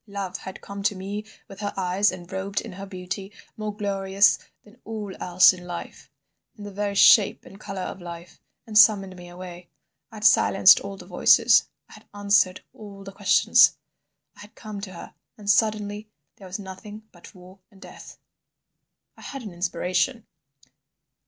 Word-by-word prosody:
Love 195 -2 -5
had 190 - -10
come 200 0 -8
to 205 0 0
me 200 +3 -5 0.2
with 195 - -13
her 205 -1 -3
eyes 190 +2 +1
and 180 -1 -11
robed 195 +1 -3
in 225 - -8
her 195 +2 -9
beauty, 190 +1 -7 0.2
more 215 -1 -4
glorious 195 -1 +2 0.2
than 220 +4 -21
all 210 -3 -6
else 180 +2 +5
in 180 -1 -11
life, 175 0 -8 0.5
in 210 - -10
the 205 - -8
very 200 0 -3
shape 200 +1 +5
and 195 - -14
colour 195 -3 -6
of 190 - -7
life, 170 0 -10 0.3
and 215 -2 +3
summoned 195 -4 +5
me 175 -1 -12
away. 175 -1 -11 0.4
I - - -13
had 210 - -9
silenced 195 -2 +6
all 200 0 -8
the - - -12
voices, - - +4 0.2
I - - -17
had - - -16
answered 200 -2 +2
all 200 -2 -12
the 195 - -9
questions—I 200 +1 +1
had 210 +1 -14
come 215 -3 -8
to 190 -2 -8
her. 170 - -11 0.2
And 210 -2 -13
suddenly 210 0 0 0.3
there 195 - -12
was 185 - -5
nothing 205 +2 -10
but 175 +1 -16
War 185 +1 -16
and 200 -3 -21
Death!" - - -13 1.0
I - - -17
had 275 -2 -8
an 205 -5 -8
inspiration. 185 +6 -2
195 Hz, 170 wpm, -24 LUFS, 185-205 Hz, 1.0 s, silenced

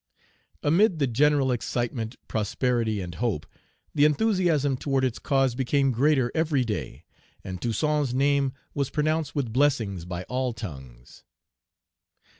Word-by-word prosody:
Amid 175 +5 +3
the 145 - +2
general 135 +2 +3
excitement, 120 -1 -2
prosperity, 110 0 0
and 90 -1 -6
hope, 105 -9 -2 0.5
the 145 - +3
enthusiasm 155 -4 +2
toward 135 0 0
its 130 -3 -1
cause 135 -2 +1
became 135 +2 +1
greater 130 0 +2
every 155 -5 +1
day, 90 - -4 0.4
and 95 -2 -6
Toussaint's 145 +3 0
name 140 +1 +2 0.2
was 140 -2 -1
pronounced 155 -1 -1
with 130 -6 -2
blessings 115 - +1
by 90 0 -5
all 125 +3 -2
tongues. 65 - -10
130 Hz, 125 wpm, -26 LUFS, 110-145 Hz, 0.5 s, Amid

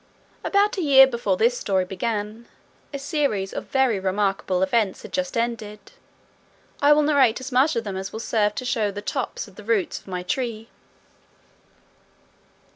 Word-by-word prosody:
About 405 +1 +2
a - - 0
year 275 -4 +8
before 235 -7 -1
this 240 +4 +2
story 190 -2 0
began, 210 +3 -4 0.4
a 280 - -4
series 275 - -1
of - - -5
very 260 -6 +1
remarkable 190 -1 0
events 200 0 0
had - - -11
just 275 -3 -2
ended. 230 -3 -4 0.9
I 290 +1 +5
will 300 0 +5
narrate 275 -6 +3
as 260 +1 -7
much 265 +5 +3
of 230 - -1
them 200 -3 -5
as 190 0 -5
will 220 - -6
serve 210 -2 0
to 255 - -4
show 230 -4 0
the 205 +1 -7
tops 260 0 -3
of 200 - -18
the 210 - -10
roots 215 -3 0
of - - -25
my 180 -1 -4
tree. 225 +2 -3
230 Hz, 170 wpm, -23 LUFS, 200-265 Hz, 0.9 s, year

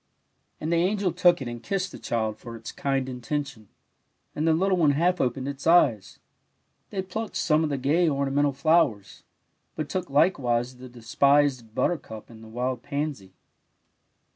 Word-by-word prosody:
And 160 +2 -2
the - - +3
angel 190 +2 +1
took 175 -3 +3
it - - -6
and 120 -1 -6
kissed 190 +5 -2
the - - -10
child 110 -2 -2
for 115 -1 -9
its 115 0 -8
kind 135 -2 -1
intention, 130 -3 -5 0.6
and 155 +2 -1
the 160 - +5
little 190 +2 +2
one 150 -4 +4
half 175 +5 +1
opened 130 +1 -1
its 140 +1 -5
eyes. 130 - +3 0.7
They 190 -2 -3
plucked 215 +4 -5
some 155 -2 +2
of 155 - 0
the 140 - -1
gay, 155 +6 +2
ornamental 140 0 +1
flowers, 140 - +1 0.5
but 155 -2 -4
took 185 +2 -3
likcTsdse 130 -5 +1
the 130 0 -10
despised 125 0 +1
buttercup 120 -11 -2
and 110 -1 -13
the - - -12
wild 125 +2 -3
pansy. 140 -11 -4
140 Hz, 165 wpm, -26 LUFS, 120-165 Hz, 0.7 s, the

